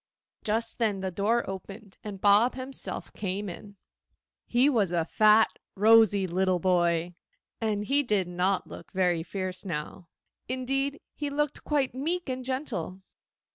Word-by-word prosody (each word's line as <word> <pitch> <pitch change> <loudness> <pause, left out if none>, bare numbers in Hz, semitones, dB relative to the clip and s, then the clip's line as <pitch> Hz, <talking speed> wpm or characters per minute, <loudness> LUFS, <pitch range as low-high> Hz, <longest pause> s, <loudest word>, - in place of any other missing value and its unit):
Just 225 +2 -1
then 210 -4 +1
the 190 -1 -2
door 215 +6 +1
opened, 195 +2 -8
and 205 -3 -6
Bob 205 +5 +5
himself 260 +1 -6
came 200 +1 -3
in. 200 +3 -9 0.7
He 245 +3 +4
was 220 -11 +2
a 170 -2 +1
fat, 215 +4 +4 0.2
rosy 210 -1 +5
little 185 +1 +1
boy, 175 -1 +1 0.5
and 210 -2 -1
he 280 +5 +2
did 210 -8 0
not 180 +2 0
look - - -11
very 180 -3 +2
fierce 185 +1 -4
now; 170 0 -5 0.4
indeed, 270 +3 -1
he 295 -1 -3
looked 295 0 -2
quite 285 -4 0
meek 325 +6 -2
and 255 0 -3
gentle. 235 - -4
205 Hz, 140 wpm, -28 LUFS, 185-255 Hz, 0.7 s, Bob